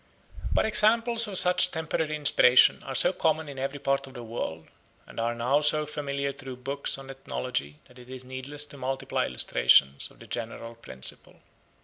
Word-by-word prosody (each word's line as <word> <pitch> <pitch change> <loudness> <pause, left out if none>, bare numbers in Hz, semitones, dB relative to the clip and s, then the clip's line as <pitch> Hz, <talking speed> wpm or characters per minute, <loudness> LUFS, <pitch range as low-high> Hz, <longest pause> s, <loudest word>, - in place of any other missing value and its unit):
But - - +2
examples 230 +2 +2
of 195 -3 +3
such 180 0 +5
temporary 160 -2 -3
inspiration 130 -4 +5
are 135 - -5
so 135 - +3
common 160 -2 0
in 140 -2 -8
every 135 +2 -3
part 135 0 -1
of 135 - -14
the 120 - -8
world 85 -8 -6 0.4
and - - -10
are 115 +1 -1
now 125 +5 +1
so 150 0 +2
familiar 140 -2 -3
through 135 -2 -9
books 135 +3 -3
on 135 0 -10
ethnology 130 - -4
that 125 -1 -18
it 125 0 -15
is 130 -1 -9
needless 130 +3 -1
to 145 - -13
multiply 130 +1 -2
illustrations 70 +3 +3
of - - -19
the - - -14
general 115 0 -6
principle. 65 - -7
135 Hz, 175 wpm, -27 LUFS, 125-150 Hz, 0.4 s, such